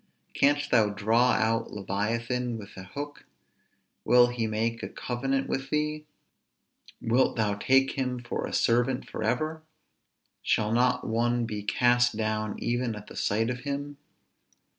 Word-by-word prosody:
Canst 145 +1 +2
thou 110 -4 +4
draw 115 +4 +2
out 115 +1 +1
leviathan 115 +5 -2
with 105 -2 -11
an 95 - -9
hook? 145 +6 -7 0.8
will 120 0 +6
he 120 -2 -2
make 115 +2 -1
a - - -5
covenant 135 +2 -2
with 135 0 -3
thee? 150 +1 -1 0.9
wilt 120 +3 +2
thou 105 -2 +1
take 135 +6 +3
him 130 -2 -2
for 120 -1 -4
a - - -7
servant 125 +3 +1
forever? 155 +5 -2 0.8
shall 110 -1 +1
not 125 +2 +2
one 120 +1 +1
be 105 -2 -4
cast 120 +3 +2
down 110 -1 -1
even 120 -1 -1
at 105 0 -9
the - - -12
sight 115 +4 0
of 125 - -4
him? 145 +1 -4
120 Hz, 140 wpm, -28 LUFS, 110-130 Hz, 0.9 s, will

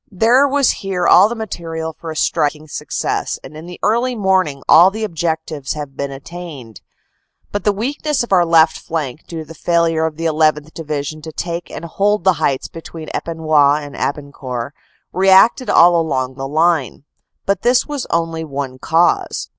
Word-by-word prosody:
There 235 +8 +3
was 280 -1 +2
here 190 -3 -2
all 205 - +6
the 235 - -4
material 165 -7 -5
for 165 - -9
a 160 - -5
striking 150 0 0
success, - - -3
and - - -11
in 160 +2 -9
the 180 - -10
early 240 +4 +1
morning 190 - 0
all 175 +4 +7
the 220 +3 -5
objectives 160 -6 -3
had 145 -3 -7
been 140 0 -3
attained. 140 - -9 0.7
But 205 - -4
the 210 - +4
weakness 275 +7 -2
of 240 - -9
our 180 -2 +5
left 165 -1 +4
flank, 155 -3 -5
due 160 -2 -6
to 165 - -11
failure 165 0 +1
of 155 -1 -7
the 165 - -4
1 160 - 0 0.2
1th. 150 +1 -12
Division 155 -1 -5
to 160 +1 -8
take 170 +2 -5
and - - -7
hold 200 +3 0
the 190 0 +4
heights 135 -1 0
between 165 -1 -10
Epinoy 155 -3 +1
and 145 - -10
Abancourt, 140 -3 -4 0.4
reacted 195 +7 +4
all 175 +1 +6
along 130 -6 -1
the 135 +1 -6
line. 155 -3 0 0.4
But 200 -1 0
this 245 +1 +3
was 290 -3 -5
only 165 -1 -1
one 135 -3 -5
cause. 165 +4 +1
165 Hz, 175 wpm, -18 LUFS, 150-190 Hz, 0.7 s, all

